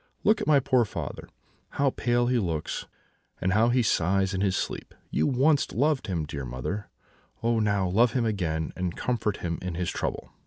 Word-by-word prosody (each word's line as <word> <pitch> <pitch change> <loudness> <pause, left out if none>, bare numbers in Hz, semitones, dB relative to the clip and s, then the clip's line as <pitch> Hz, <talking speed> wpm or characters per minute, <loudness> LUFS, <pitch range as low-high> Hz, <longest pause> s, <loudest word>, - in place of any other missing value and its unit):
'Look 215 0 +4
at - - -3
my 150 -2 +6
poor 130 -2 +3
father; 105 - -6 0.5
how 140 -1 +3
pale 120 -1 +1
he 125 0 +2
looks, 80 -7 -3 0.5
and 95 +1 +1
how 110 +3 +4
he 125 0 +3
sighs 95 0 +2
in 95 - -1
his 95 -2 +2
sleep! - - -4 0.2
You 80 - +2
once 140 +3 +3
loved 145 +2 +1
him, 85 -5 -1
dear 70 -1 -5
mother; 65 +12 -4 0.5
oh 115 0 +2
now, 100 -3 +1
love 110 +6 +3
him 125 -3 +1
again, 80 -7 -1
and 90 -1 -3
comfort 110 -5 -1
him 85 -1 -2
in 90 -2 -4
his 90 0 -1
trouble!' - - -4
100 Hz, 190 wpm, -27 LUFS, 90-120 Hz, 0.5 s, my